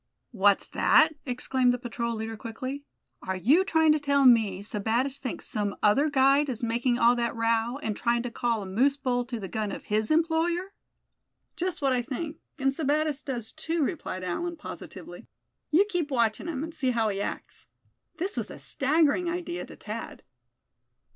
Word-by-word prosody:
"What's 205 -3 +3
that?" - - +5 0.2
exclaimed 250 0 +1
the 245 - 0
patrol 235 -1 -3
leader, 220 0 -4
quickly; 255 +6 -6 0.4
"are 190 - -3
you 275 - +4
trying 320 -4 +3
to 305 - +3
tell 280 -1 +2
me 215 -6 +4
Sebattis 230 +7 -1
thinks 255 - -5
some 205 -1 -2
other 275 +9 +4
guide 275 +1 +4
is 240 -2 -4
making 240 +1 +1
all 240 0 +5
that 235 -1 -1
row, 230 +2 +1
and 215 -2 -2
trying 235 +1 0
to 245 - -4
call 230 -2 -1
a - - -7
moose 255 +9 +2
bull 250 -3 -1
to 240 -2 -5
the 195 - -5
gun 210 +2 -3
of - - -6
his 215 +1 0
employer?" 335 +4 +1 0.8
"Just 355 -4 -3
what 270 -1 +3
I 250 - +1
think; 295 +6 -5 0.2
and 270 -2 +2
Sebattis 300 0 0
does 240 -5 -4
too," 325 -1 -1
replied 270 - -3
Allan, 340 - -3
positively. 300 - -9 0.4
"You 355 +7 +5
keep 350 -7 -1
watching 235 0 0
him, 300 -4 -3
and 325 +1 -6
see 260 -4 -1
how 230 -3 +1
he 200 -1 -2
acts." - - -6 0.5
This 380 +5 -3
was - - -3
a - - -9
staggering 310 +4 +2
idea 345 0 -4
to - - -11
Thad. - - -7
255 Hz, 180 wpm, -27 LUFS, 230-305 Hz, 0.8 s, that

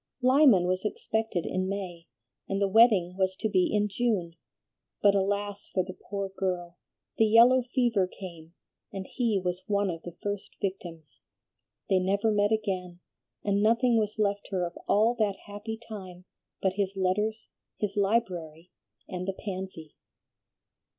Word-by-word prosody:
Lyman 255 -8 +6
was 185 +1 0
expected 220 -3 -2
in 185 0 -1
May, 180 -4 -5 0.4
and 195 - 0
the 200 - +2
wedding 195 -4 +5
was 190 -1 +1
to 220 - -1
be 185 -4 +2
in 210 0 +2
June; 200 -6 -1 0.6
but, 200 -1 +5
alas 200 +1 -1
for 185 - 0
the 185 0 -8
poor 200 +1 -5
girl! 180 -2 -3 0.4
the 225 - +6
yellow 235 +4 +7
fever 240 -6 +1
came, 170 -3 -11 0.4
and 195 -1 -5
he 230 -2 0
was 180 0 -3
one 200 -2 +1
of 165 -1 -7
the 175 - -8
first 205 -1 -4
victims. 170 -6 -6 0.7
They 190 - +3
never 200 +4 +1
met 205 0 +2
again, 185 -5 -2 0.4
and 200 0 +1
nothing 230 +2 +4
was 215 0 -2
left 205 -1 0
her 185 -3 0
of 170 - -7
all 220 +4 +4
that 205 -3 +1
happy 205 +2 -6
time 190 -6 -10 0.4
but 190 -1 +2
his 195 0 -1
letters, 210 +4 0 0.3
his 205 -2 -2
library, 185 -6 -1 0.4
and 185 0 -5
the 195 - -1
pansy." 185 -6 -7
195 Hz, 150 wpm, -28 LUFS, 185-215 Hz, 0.7 s, yellow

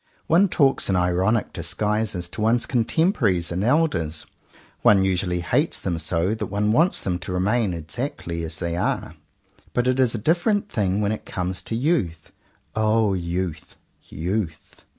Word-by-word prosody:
One 180 +5 +4
talks 140 -9 +2
in 95 - +2
ironic 90 +5 +1
disguises 105 -4 -2
to 105 - -6
one's 115 +2 +2
contemporaries 115 - +1
and 90 +3 -1
elders. 120 - +1 0.6
One 100 -2 +5
usually 90 -2 0
hates 85 - 0
them 85 -2 -2
so 85 +5 0
that 110 - -3
one 105 +1 0
wants 165 +10 +3
them 90 -2 -2
to 90 - -6
remain 100 +4 +1
exactly 85 - -4
as 80 0 -2
they 85 -1 -2
are. 90 - -1 0.6
But 120 - +2
it 130 +1 +2
is 125 -3 +3
a - - -1
different 175 - +1
thing 100 - 0
when 105 0 +1
it 110 - -5
comes 90 0 -3
to 115 - -4
youth. 115 - -1 0.4
O 110 -1 +2
youth, 85 -2 -3 0.3
youth! 85 0 -4
100 Hz, 155 wpm, -23 LUFS, 90-120 Hz, 0.6 s, One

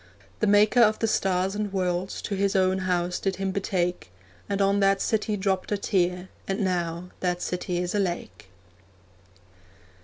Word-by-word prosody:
The 215 - +1
maker 210 +4 +5
of 215 -2 +5
the - - 0
stars 190 -2 +1
and 210 -1 -2
worlds 185 -1 -2
To - - -3
His 200 +1 0
own 190 0 +3
house 180 -1 -1
did 195 -1 -1
Him 195 0 -2
betake, 180 - -1 0.4
And 200 0 -1
on 200 0 +3
that 195 0 +3
city 215 0 0
dropped 190 0 -1
a 205 - +2
tear, 180 -2 0 0.2
And 195 +3 -1
now 175 -2 -2
that 180 -1 -1
city 180 0 -2
is 175 0 -2
a 205 - +1
lake. 105 - -4
190 Hz, 165 wpm, -26 LUFS, 180-200 Hz, 0.4 s, maker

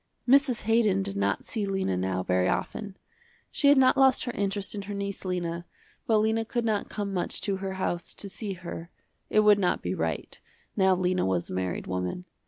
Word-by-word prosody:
Mrs. 270 -2 +4
Haydon 215 -3 +3
did 195 0 -3
not 200 - 0
see 215 -4 -2
Lena 190 - 0
now 95 0 -1
very 90 0 +2
often. 205 -3 -3 0.5
She 285 - +2
had 285 0 +7
not 260 -1 +5
lost 265 -1 +4
her 245 - -2
interest 200 -2 -2
in 205 - -4
her 200 +1 -6
niece 200 0 -4
Lena, 175 -2 -3 0.4
but 225 -3 +4
Lena 220 +1 +2
could 235 +1 -2
not 215 -2 0
come 205 -2 -3
much 180 - -2
to 195 -2 -1
her 190 0 -4
house 175 -2 -3
to 200 - -6
see 195 +1 -5
her, 170 -2 -7 0.4
it 215 - +4
would 210 -1 +6
not 180 -2 +1
be 90 - -1
right, 80 -4 -3 0.4
now 190 -2 +4
Lena 185 0 +1
was 90 -2 -1
a - - -4
married 90 -1 -2
woman. 90 - -3
195 Hz, 200 wpm, -27 LUFS, 175-215 Hz, 0.5 s, had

